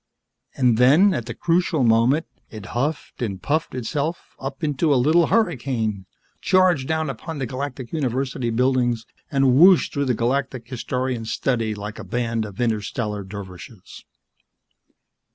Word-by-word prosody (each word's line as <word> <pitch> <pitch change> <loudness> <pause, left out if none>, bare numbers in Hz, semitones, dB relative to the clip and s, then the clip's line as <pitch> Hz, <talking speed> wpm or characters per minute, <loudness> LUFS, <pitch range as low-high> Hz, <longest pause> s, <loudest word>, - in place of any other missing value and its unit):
And 125 -4 +2
then, 155 +11 +6
at 120 -8 -3
the 120 - -5
crucial 170 -4 +1
moment, 120 +7 +3 0.2
it 110 -3 -9
huffed 145 +5 -3
and 100 -6 -3
puffed 155 - -1
itself 145 +7 -3
up 135 +3 -6
into 150 +1 +1
a - - +5
little 155 +7 +4
hurricane, 115 - 0 0.3
charged 180 -7 +3
down 160 0 0
upon 145 +5 -6
the 135 - -2
Galactic 130 -1 -5
University 130 -4 -1
buildings 120 -1 +1 0.2
and 135 -3 +3
whooshed 180 +1 +6
through 140 -1 0
the 125 -2 +1
Galactic 130 0 -1
Historian's 125 -2 -3
study 115 -5 -1
like 105 +1 -7
a - - -6
band 115 -2 -2
of 100 -2 -10
interstellar 105 -2 -2
dervishes. 95 +1 -10
125 Hz, 140 wpm, -22 LUFS, 115-145 Hz, 0.3 s, then